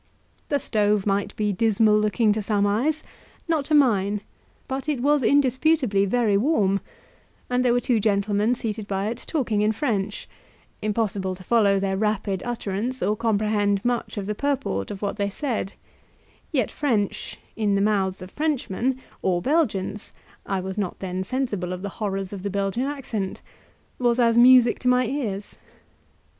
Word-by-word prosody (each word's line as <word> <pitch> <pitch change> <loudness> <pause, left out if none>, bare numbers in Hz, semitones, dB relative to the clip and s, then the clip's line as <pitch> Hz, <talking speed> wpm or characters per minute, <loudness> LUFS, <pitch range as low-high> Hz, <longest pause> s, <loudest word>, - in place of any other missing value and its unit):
The 285 - +2
stove 210 -4 +1
might 200 0 0
be 210 -1 0
dismal 215 +1 +3
looking 215 +1 +2
to 215 - -2
some 205 -1 +1
eyes, 265 +10 0 0.4
not 315 -4 0
to 305 - +2
mine, 210 -7 +3 0.5
but 265 +3 -3
it 290 -4 0
was 290 +3 +3
indisputably 260 -4 +3
very 215 -1 +2
warm, 200 -6 +2 0.7
and 250 0 +2
there 245 - +3
were 245 - +3
two 245 -2 +1
gentlemen 205 +2 +1
seated 215 -3 -4
by 195 +1 -1
it 235 +2 -5
talking 235 -9 0
in 210 +1 +3
French; 210 -4 -2 0.5
impossible 205 -3 -1
to 185 - -13
follow 200 -3 +3
their 195 0 -1
rapid 210 -2 -1
utterance, 240 +1 -3
or 205 +3 +1
comprehend 210 -2 +1
much 240 -2 -1
of 200 - -3
the 210 - -2
purport 270 - -2
of 200 0 -7
what 205 - -2
they 200 -1 0
said 225 -3 -3 0.8
yet 260 -9 0
French, 225 -9 -1 0.2
in 210 -2 +1
the - - +2
mouths 195 -2 0
of 185 - -11
Frenchmen, 265 -4 -1 0.2
or 180 -2 +1
Belgians 210 - -1 0.3
(I 195 -1 -1
was 190 +2 -4
not 190 -4 -2
then 185 0 -3
sensible 205 -6 -2
of 180 +1 -7
the 200 - -3
horrors 195 -2 -2
of 195 - -6
the 200 - -3
Belgian 200 +5 -1
accent) 235 -9 -4 0.6
was 240 -1 +2
as 230 -2 +3
music 245 0 +6
to 250 - -3
my 250 0 +4
ears. 220 -7 -4
215 Hz, 165 wpm, -24 LUFS, 200-250 Hz, 0.8 s, music